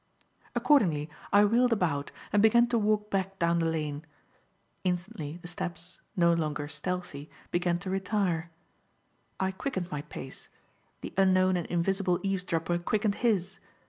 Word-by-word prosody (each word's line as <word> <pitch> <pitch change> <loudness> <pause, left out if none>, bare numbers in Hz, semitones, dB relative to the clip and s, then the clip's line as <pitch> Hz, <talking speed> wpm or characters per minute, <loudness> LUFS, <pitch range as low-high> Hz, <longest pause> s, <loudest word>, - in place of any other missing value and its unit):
Accordingly 205 - +3 0.2
I 205 +1 +6
wheeled 240 +4 +3
about 160 -10 0 0.2
and 205 - +5
began 235 +2 +6
to 240 - +2
walk 210 0 +1
back 195 0 -1
down 170 -1 +2
the 165 - +1
lane. 150 -2 -2 0.8
Instantly, 180 -3 -3
the - - -6
steps 175 0 -5 0.2
no 170 -1 +5
longer 150 -3 -1
stealthy 170 -3 -5 0.2
began 175 0 +1
to 185 +2 -6
retire. 190 -4 0 0.9
I 190 0 +1
quickened 190 -3 -4
my 150 - -2
pace; 135 -2 -9 0.5
the - - -6
unknown 185 -1 +4
and 175 -2 -2
invisible 180 +1 +1
eavesdropper 175 -3 -1
quickened 210 +4 +1
his. 195 -6 +1
180 Hz, 140 wpm, -29 LUFS, 170-200 Hz, 0.9 s, I